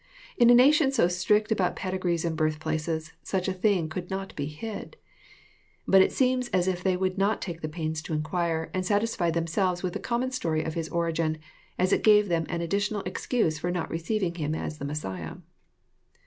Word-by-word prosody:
In 240 -1 +5
a 245 - +8
nation 275 +3 +5
so 230 -10 +3
strict 210 +5 +1
about 190 -5 +1
pedigrees 185 -3 -1
and 165 -1 -1
birthplaces, 160 0 -2
such 190 -1 -2
a 190 - 0
thing 185 -3 +1
could 175 +3 -6
not 195 0 -5
be 145 -1 -3
hid. 200 +8 -7 0.9
But 195 0 +7
it - - +3
seems 255 -1 +1
as 185 -4 +1
if 180 -1 -1
they 185 -1 +2
would 185 +1 -1
not 200 +2 +2
take 170 -3 -6
the 155 - -3
pains 155 0 -3
to 160 - -6
inquire, 160 +1 -1
and 185 - -1
satisfied 205 -4 0
themselves 175 +2 0
with 180 -1 -2
the - - -3
common 245 +2 -1
story 165 -11 -1
of 160 - -3
His 165 -1 -3
origin, 165 -2 0 0.4
as 185 +2 +2
it - - +2
gave 210 -2 +5
them 165 -2 0
an 170 0 -2
additional 200 +4 -1
excuse 185 -3 -1
for 175 - -2
not 175 -2 -2
receiving 175 +2 -1
Him 155 -2 -2
as 155 -1 -5
the 140 - -4
Messiah. 95 - -5
175 Hz, 195 wpm, -27 LUFS, 160-200 Hz, 0.9 s, a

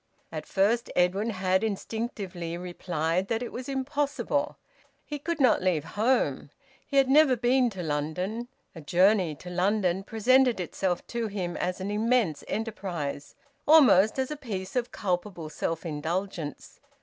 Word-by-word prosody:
At - - -6
first 220 +5 +1
Edwin 190 +5 +2
had 190 -1 +1
instinctively 200 -5 -4
replied 175 0 -2
that 225 +2 -1
it 245 - -6
was 255 +2 -6
impossible. 285 +1 -1 0.5
He 295 -1 -5
could 330 +3 -3
not 255 -7 +4
leave 180 -5 +1
home. 215 - 0 0.4
He 280 - -1
had 270 -1 +5
never 275 -1 +6
been 245 +2 +3
to 190 -5 -6
London; 170 +10 -2 0.3
a 165 - -9
journey 180 +1 +3
to 180 +5 -10
London 185 0 +1
presented 245 +3 +3
itself 180 0 -2
to 235 -1 -2
him 185 -4 -4
as 180 +1 -2
an 190 +2 -3
immense 215 -6 +1
enterprise, 185 -10 -4 0.3
almost 260 - +6
as 265 +2 -1
a - - -2
piece 205 -9 -6
of 245 -1 -1
culpable 180 -3 -3
self 165 +2 -3
indulgence. 165 +1 -4
200 Hz, 145 wpm, -27 LUFS, 175-240 Hz, 0.5 s, never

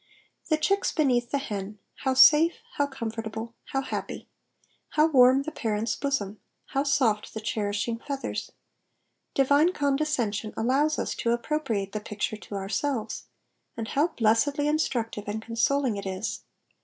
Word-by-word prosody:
The 310 - +3
chicks 395 +6 +1
beneath 250 -6 +2
the 280 - 0
hen 210 -6 -5 0.2
how 265 -2 0
safe, 315 +5 +7 0.2
how 285 - +2
comfortable, 225 -3 -5
how 270 - -1
happy! - - -5 0.7
How 305 - +5
warm 265 -3 +6
the 315 - -5
parent's 220 -2 -1
bosom 215 -8 -2 0.3
I - - -17
How 275 - +2
soft 250 -9 +1
the - - -2
cherishing 215 +1 -2
feathers 275 +2 -4
I - - -29 0.8
Divine 285 +6 +4
condescension 275 - 0
allows 275 +7 +2
us - - -1
to 235 - +1
appropriate 235 -6 -1
the 215 - -3
picture 210 +1 -3
to 210 - -9
ourselves, 215 - -2 0.5
and 225 -1 -4
how 295 +4 +2
blessedly 280 +4 +2
instructive 240 -9 -1
and 210 +1 -2
consoling 230 +1 0
it 200 - -5
is 190 +3 -3
240 Hz, 145 wpm, -27 LUFS, 215-285 Hz, 0.8 s, safe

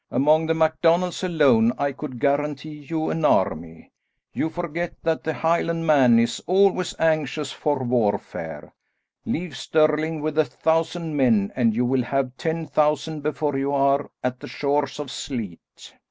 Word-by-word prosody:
Among 155 +5 +3
the 160 - +1
MacDonalds 165 +3 +1
alone 135 -10 +3
I 140 0 0
could 135 -2 -8
guarantee 145 +2 -2
you 160 -1 -1
an 160 - -3
army. 80 - 0 0.4
You 160 - -1
forget 170 0 -4
that 165 -1 0
the 160 - -1
Highlandman 165 -6 +3
is 115 0 0
always 185 0 +2
anxious 155 -3 0
for 145 -3 -1
warfare. 100 -10 -2 0.5
Leave 170 -4 -3
Stirling 155 +3 +1
with 155 0 -2
a 155 - +4
thousand 165 0 -1
men 115 -8 +2
and 115 -4 +2
you 125 +2 +1
will 130 +1 +1
have 130 +1 -2
ten 160 +3 -3
thousand 150 +1 0
before 150 -1 -2
you 140 +1 -1
are 140 +1 +2
at 125 0 -2
the - - -9
shores 140 -1 -1
of 145 -3 -5
Sleat." 110 - -5
150 Hz, 150 wpm, -23 LUFS, 130-160 Hz, 0.5 s, a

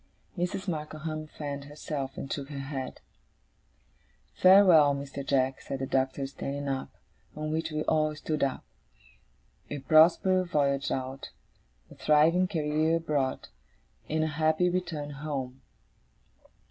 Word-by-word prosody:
Mrs. 185 +2 -3
Markleham 155 -1 -4
fanned 145 -2 -6
herself, 145 -2 -5
and 135 - -4
shook 140 -1 -5
her 145 - -6
head. 135 -1 -5 1.3
'Farewell, 180 -7 +6
Mr. 140 0 -6
Jack,' 135 -1 +1
said 135 - -5
the 135 - -3
Doctor, 135 +1 0
standing 140 +1 -5
up; 135 -1 -2 0.5
on 155 0 -3
which 160 +1 -1
we 155 -1 -2
all 155 -1 +1
stood 155 -1 -2
up. 135 -1 -1 1.0
'A 145 - -4
prosperous 175 +5 +4
voyage 140 -4 +1
out, 130 +1 -4 0.6
a - - -10
thriving 160 +5 +3
career 155 -2 +1
abroad, 150 -5 -1 0.6
and 155 +1 +1
a - - +1
happy 155 +3 +1
return 165 -5 -3
home! 135 -3 -5
150 Hz, 125 wpm, -29 LUFS, 140-160 Hz, 1.3 s, Farewell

